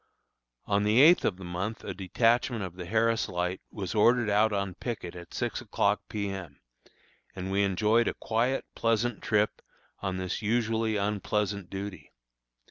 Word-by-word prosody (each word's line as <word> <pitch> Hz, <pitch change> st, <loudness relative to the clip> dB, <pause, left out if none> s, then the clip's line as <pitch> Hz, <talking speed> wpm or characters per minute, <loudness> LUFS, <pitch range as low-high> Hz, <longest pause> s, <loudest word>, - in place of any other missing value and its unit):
On 100 Hz, 0 st, +1 dB
the 105 Hz, +3 st, +3 dB
eighth 165 Hz, +6 st, +7 dB
of 90 Hz, -, 0 dB
the 95 Hz, -, -10 dB
month 95 Hz, +6 st, -4 dB
a -, -, -4 dB
detachment 115 Hz, +4 st, +1 dB
of 90 Hz, -2 st, -6 dB
the 90 Hz, -2 st, -7 dB
Harris 115 Hz, +2 st, +1 dB
Light 90 Hz, +1 st, -2 dB
was 95 Hz, -3 st, -5 dB
ordered 115 Hz, 0 st, +4 dB
out 105 Hz, +2 st, +4 dB
on 100 Hz, -2 st, -1 dB
picket 95 Hz, -5 st, -5 dB
at 85 Hz, -1 st, -10 dB
six -, -, -2 dB
o'clock -, -, +1 dB
P. 105 Hz, -1 st, -2 dB
M., 95 Hz, -7 st, -7 dB, 0.8 s
and 95 Hz, 0 st, -4 dB
we 100 Hz, +1 st, +2 dB
enjoyed 105 Hz, +4 st, +3 dB
a -, -, -1 dB
quiet, 120 Hz, +4 st, 0 dB
pleasant 115 Hz, 0 st, 0 dB
trip 105 Hz, -1 st, +1 dB, 0.4 s
on 95 Hz, -1 st, -3 dB
this 95 Hz, +3 st, -3 dB
usually 110 Hz, 0 st, +1 dB
unpleasant 100 Hz, -1 st, -1 dB
duty. 95 Hz, -2 st, -7 dB
105 Hz, 160 wpm, -29 LUFS, 95-115 Hz, 0.8 s, eighth